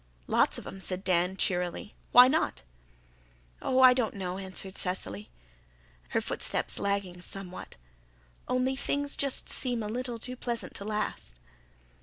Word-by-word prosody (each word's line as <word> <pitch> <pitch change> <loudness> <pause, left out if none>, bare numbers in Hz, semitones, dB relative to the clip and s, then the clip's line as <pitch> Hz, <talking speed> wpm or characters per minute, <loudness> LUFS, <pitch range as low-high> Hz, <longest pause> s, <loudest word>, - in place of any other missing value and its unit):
"Lots - - +3
of - - -8
'em," 195 - -8
said 185 0 -1
Dan 180 0 +2
cheerily. 180 +2 -1 0.2
"Why 250 +1 +10
not?" 270 - +1 1.0
"Oh, 260 0 +2
I 255 -1 +10
don't 245 -5 0
know," 185 -1 -3
answered 190 0 -6
Cecily, 105 - -3 0.8
her - - +1
footsteps - - -1
lagging 200 -3 -1
somewhat. 185 0 -6 0.7
"Only 255 +1 +1
things 285 +1 -1
seem - - -4
just 275 -2 +1
a 245 - +1
little 240 +2 -3
too 250 +3 -5
pleasant 240 -2 -4
to 200 - -7
last." 210 - -3
200 Hz, 140 wpm, -30 LUFS, 185-250 Hz, 1.0 s, Why